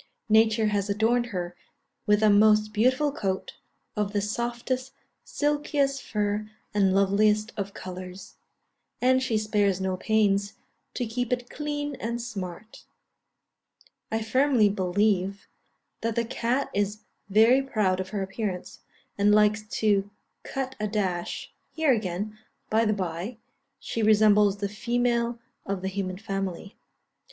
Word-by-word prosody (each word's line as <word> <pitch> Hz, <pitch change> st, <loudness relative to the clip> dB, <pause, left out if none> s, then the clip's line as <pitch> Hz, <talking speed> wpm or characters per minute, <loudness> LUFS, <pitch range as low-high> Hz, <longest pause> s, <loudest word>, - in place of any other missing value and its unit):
Nature 220 Hz, 0 st, +4 dB
has 205 Hz, -1 st, -1 dB
adorned 230 Hz, +4 st, +2 dB
her 175 Hz, -5 st, -4 dB, 0.5 s
with 210 Hz, +1 st, +4 dB
a 215 Hz, -, +6 dB
most 215 Hz, +1 st, +4 dB
beautiful 255 Hz, +7 st, +2 dB
coat, 190 Hz, -8 st, -3 dB, 0.4 s
of 210 Hz, -1 st, -1 dB
the 205 Hz, -, +2 dB
softest, 240 Hz, +5 st, -3 dB, 0.3 s
silkiest 290 Hz, -2 st, 0 dB
fur 210 Hz, 0 st, -2 dB, 0.2 s
and 195 Hz, -2 st, +3 dB
loveliest 210 Hz, +3 st, +3 dB
of 200 Hz, -1 st, -4 dB
colours; 185 Hz, +1 st, -8 dB, 0.6 s
and 260 Hz, +1 st, +3 dB
she 245 Hz, -4 st, 0 dB
spares 205 Hz, -3 st, +1 dB
no 190 Hz, -1 st, -1 dB
pains 200 Hz, 0 st, +1 dB, 0.4 s
to 245 Hz, -, -1 dB
keep 245 Hz, +2 st, -3 dB
it 245 Hz, 0 st, -2 dB
clean 290 Hz, -1 st, -3 dB
and 235 Hz, +1 st, -3 dB
smart. 215 Hz, -3 st, -7 dB, 1.3 s
I 220 Hz, 0 st, 0 dB
firmly 250 Hz, -1 st, +3 dB
believe 195 Hz, 0 st, 0 dB, 0.5 s
that 230 Hz, -1 st, -1 dB
the 235 Hz, -, +1 dB
cat 245 Hz, +3 st, -1 dB
is 205 Hz, +1 st, -1 dB, 0.3 s
very 225 Hz, +6 st, +5 dB
proud 210 Hz, -9 st, 0 dB
of 185 Hz, 0 st, -4 dB
her 205 Hz, -2 st, -2 dB
appearance, 195 Hz, -2 st, -4 dB, 0.4 s
and 205 Hz, +1 st, +5 dB
likes 210 Hz, 0 st, +4 dB, 0.2 s
to 205 Hz, -2 st, +2 dB, 0.3 s
cut 265 Hz, -1 st, -4 dB
a 210 Hz, -, -1 dB
dash 190 Hz, -5 st, -2 dB, 0.2 s
here 315 Hz, -4 st, +2 dB
again, 210 Hz, 0 st, -3 dB, 0.3 s
by 225 Hz, +1 st, +3 dB
the 215 Hz, -, +2 dB
bye, 185 Hz, +3 st, -4 dB, 0.4 s
she 230 Hz, -, -3 dB
resembles 210 Hz, -1 st, +5 dB
the 200 Hz, 0 st, -2 dB
female 235 Hz, +2 st, 0 dB, 0.3 s
of 195 Hz, -1 st, -4 dB
the -, -, -1 dB
human 185 Hz, -1 st, -3 dB
family. 195 Hz, -2 st, -4 dB
215 Hz, 130 wpm, -26 LUFS, 200-235 Hz, 1.3 s, a